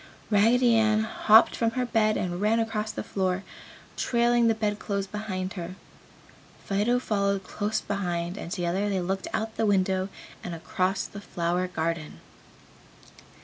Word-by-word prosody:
Raggedy 230 +3 +4
Ann 215 -1 +3
hopped 220 0 +5
from 230 - +1
her 250 - +1
bed 215 -2 +2
and 175 0 -2
ran 220 +2 +3
across 220 -1 -1
the - - -5
floor, 190 -1 -1 0.5
trailing 235 -1 +2
the 225 - +3
bed 210 -1 -1
clothes 200 -2 -2
behind 190 -2 -4
her. 180 -1 -6 0.9
Fido 210 +5 +1
followed 200 -5 0
close 210 +3 -2
behind 175 -3 -2
and 170 - -7
together 180 +4 -1
they 195 -2 0
looked 190 +2 -2
out 220 0 -3
the 225 - +1
window 190 -1 +1 0.3
across 185 +2 -1
the 200 - -9
flower 175 -1 -1
garden. 165 -3 -3
200 Hz, 145 wpm, -27 LUFS, 185-220 Hz, 0.9 s, hopped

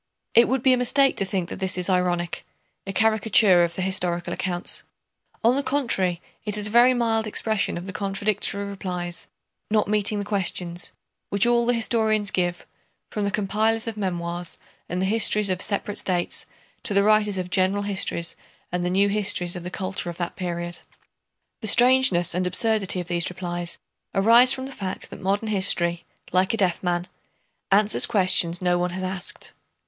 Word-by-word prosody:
It 235 +1 +6
would 260 -1 -1
be 260 - +5
a - - +2
mistake 270 +2 +3
to 195 - -1
think 185 -3 -3
that - - -7
this 190 -1 0
is 180 - +1
ironic—a 180 +1 -3
caricature 215 -4 +4
of 170 0 -2
the 185 - -3
historical 180 -2 -1
accounts. 175 -1 -1 0.6
On 235 +3 +4
the 280 - +1
contrary 235 -11 0 0.2
it 210 -1 -1
is 210 - -1
a - - +2
very 245 +2 +5
mild 225 -2 0
expression 215 -2 -1
of 175 - -7
the 195 - -7
contradictory 200 0 -1
replies, 180 -3 -4 0.4
not 215 -1 +1
meeting 210 0 +1
the 205 - -3
questions, 180 -3 -2 0.4
which 200 +1 +3
all 240 0 +2
the 245 - +2
historians 220 -2 +1
give, 175 -1 -2 0.5
from 210 -1 -2
the - - 0
compilers 215 +2 0
of 225 - -4
memoirs 175 -3 -4 0.3
and 180 +2 -2
the - - +1
histories 210 0 +2
of 185 0 -2
separate 205 0 -2
states 180 -2 -2 0.3
to 205 - -2
the 200 - +4
writers 210 -1 +3
of 180 -1 -5
general 190 +2 +2
histories 190 -4 -1 0.4
and 180 0 -2
the 180 - -1
new 195 +2 +2
histories 195 -4 0
of 175 - -6
the 180 - -5
culture 185 -2 -4
of 170 - -8
that 175 -1 -4
period. 175 -1 -4 0.8
The 220 - -4
strangeness 240 -7 +5
and 180 +1 -1
absurdity 195 0 +2
of 175 - -6
these 170 -1 0
replies 175 -1 -5 0.4
arise 230 +6 +6
from 260 -1 +2
the 270 - -8
fact 190 -7 -6
that - - -10
modern 200 +3 -1
history, 175 -4 +2 0.3
like 185 +4 +1
a - - -6
deaf 185 -5 0
man, 175 -1 -1 0.7
answers 205 +2 +4
questions 185 -4 +3
no 175 0 +1
one 180 0 0
has 185 +2 -6
asked. 185 0 -4
195 Hz, 180 wpm, -23 LUFS, 180-215 Hz, 0.8 s, It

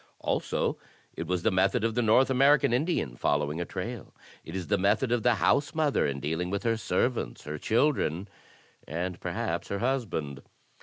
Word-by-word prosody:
Also - - -1 0.3
it 80 - -5
was 90 0 -1
the 110 - +3
method 95 +5 +2
of 115 0 +1
the 120 - +1
North 120 +4 +4
American 140 0 +4
Indian 130 - 0
fol 70 - +1
lowing 75 +3 -3
a - - -2
trail. 105 +6 -6 0.3
It 80 - -8
is 95 -2 -3
the 100 -1 +1
method 105 +6 +2
of 120 -1 +2
the 120 +1 +3
housemother 145 - +2
in 70 -1 -3
dealing 80 +5 -2
with 100 +1 -2
her 115 -1 +2
servants, 115 - -1
her 75 0 -6
children, 110 - +1 0.6
and 85 +3 -3
perhaps - - -3
her 100 - -2
husband. 100 - -2
100 Hz, 175 wpm, -28 LUFS, 85-125 Hz, 0.6 s, North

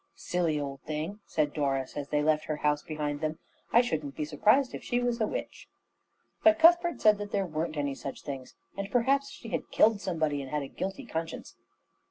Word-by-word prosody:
"Silly 170 -4 0
old 135 -2 -5
thing," 155 +7 -4
said 150 -2 0
Doris, 135 -3 -1
as 145 -1 -4
they 150 0 +1
left 155 0 +2
her 155 - -2
house 150 0 +1
behind 150 -1 -3
them. 155 0 -1 0.3
"I 235 - +7
shouldn't 150 - -3
be 150 - -2
surprised 215 - +3
if - - -6
she 245 - 0
was 245 -1 0
a 215 - +3
witch." - - -5 0.8
But 325 0 +7
Cuthbert 345 +1 +5
said 210 -1 +5
that 205 0 -5
there 195 -1 +1
weren't 160 -1 -3
any 145 -1 0
such 135 0 -7
things, 135 -3 -7 0.2
and 200 0 -4
perhaps 275 +3 +2
she - - -10
had - - -3
killed 215 -2 +4
somebody 160 -6 -1
and 135 - -7
had 150 0 -1
a - - -6
guilty 195 - -5
conscience. 165 -6 -5
160 Hz, 205 wpm, -29 LUFS, 150-215 Hz, 0.8 s, I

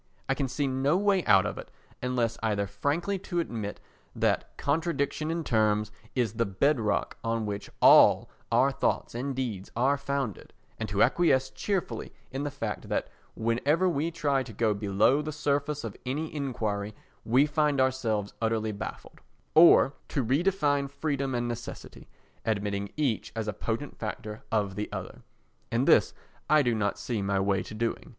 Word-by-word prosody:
I 135 - +2
can 135 0 -1
see 140 +3 -1
no 135 +5 +1
way 200 -2 +2
out 95 -2 +5
of - - -3
it - - -9 0.3
unless 125 -2 0
either 105 -2 0
frankly 170 - -1
to 175 -1 -3
admit 110 -10 -4 0.4
that - - 0
contradiction 155 0 -1
in 165 0 -1
terms 105 -4 +1 0.2
is 120 -5 +1
the 115 +1 0
bedrock 110 +2 +1
on 115 -1 -1
which 100 -1 -4
all - - +7 0.2
our - - +4
thoughts - - -1
and 130 +3 -3
deeds 115 -7 -3
are 135 +5 +2
founded, 140 -6 -3 0.3
and 110 -2 -3
to 100 0 +3
acquiesce 135 -7 +3
cheerfully 180 - -3 0.2
in 135 +2 -3
the 145 - -1
fact 115 -7 -5
that - - -1 0.3
whenever 140 +10 +1
we 165 -2 0
try 145 -5 0
to 130 - -7
go 110 0 +1
below 105 +7 +2
the 155 +1 -4
surface 145 0 -1
of 115 -3 -5
any 150 +6 -3
enquiry 110 -8 -3 0.3
we 130 +5 +4
find 150 -2 +1
ourselves 115 -6 0
utterly 110 -1 0
baffled—or 120 - +2
to 135 -5 -1
redefine 145 0 +1
freedom 140 -2 -2
and 120 0 -1
necessity, 120 0 -7 0.4
admitting 100 -2 -1
each 135 -8 0
as 110 -1 -3
a 105 - -1
potent 115 +6 -4
factor 105 -1 -5
of 105 -3 +1
the 105 +2 -4
other. - - -6 0.5
And - - +1
this - - +5 0.3
I 155 -1 +5
do 120 -2 +2
not 105 -2 0
see 115 -4 -3
my 100 0 0
way 95 -1 +1
to 110 - -8
doing. 115 +1 -2
125 Hz, 165 wpm, -28 LUFS, 105-145 Hz, 0.5 s, all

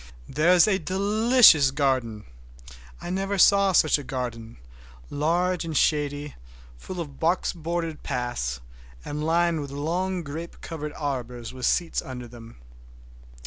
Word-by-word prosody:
There 155 +5 +2
is 180 +3 +6
a 195 -2 +2
delicious 200 - +5
garden! 130 -6 -1 0.7
I 175 - -6
never 195 +2 -2
saw 200 +1 +5
such 155 -4 +3
a - - -7
garden—large 120 - -4
and 160 -3 -3
shady, 145 0 0 0.4
full 180 - -8
of 145 -5 -7
box 170 +3 +1
bordered 165 -1 -4
paths, 120 - -3 0.4
and 150 +1 -4
lined 165 0 +1
with 140 - -6
long 175 +6 -2
grape 160 +4 -8
covered 150 -3 -6
arbors 125 -5 -5
with 130 -2 -2
seats 170 -2 0
under 125 -2 -8
them. 115 -1 -13
150 Hz, 130 wpm, -25 LUFS, 125-175 Hz, 0.7 s, is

